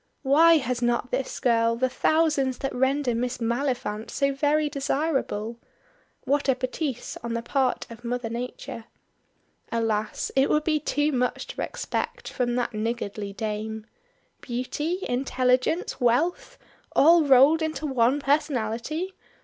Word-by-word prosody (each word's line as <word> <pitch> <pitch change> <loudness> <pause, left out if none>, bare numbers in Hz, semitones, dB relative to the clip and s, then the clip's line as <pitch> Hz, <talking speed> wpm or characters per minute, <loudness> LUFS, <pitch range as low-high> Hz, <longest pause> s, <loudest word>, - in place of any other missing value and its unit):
Why 320 +5 +6
has 250 -3 -2
not 240 +1 0
this 260 +1 -2
girl 230 -1 +2
the 260 +2 +1
thousands 275 -1 +1
that 270 - -3
render 265 0 +1
Miss 245 +2 -2
Maliphant 235 -2 -2
so 275 -1 0
very 295 +2 +2
desirable? 275 -6 -2 0.6
What 285 0 +1
a 265 - +4
bêtise 255 0 -4
on 235 0 -3
the 230 - -3
part 260 0 0
of 230 +1 -11
Mother 245 0 -2
Nature. 245 0 -6 0.9
Alas! 220 -2 -1
it 270 +1 +3
would 300 - +2
be 310 -1 +1
too 295 0 0
much 250 -2 -1
to - - -5
expect - - -4
from 240 -1 -1
that 245 -1 -1
niggardly 215 -2 -3
Dame. 215 +1 -4 0.6
Beauty, 295 +9 -3
intelligence, 255 +5 0
wealth! 320 - +1 0.4
All 330 +2 +6
rolled 280 +3 +6
into 315 0 -2
one 260 0 +2
personality. 285 - -1
255 Hz, 135 wpm, -25 LUFS, 235-290 Hz, 0.9 s, Why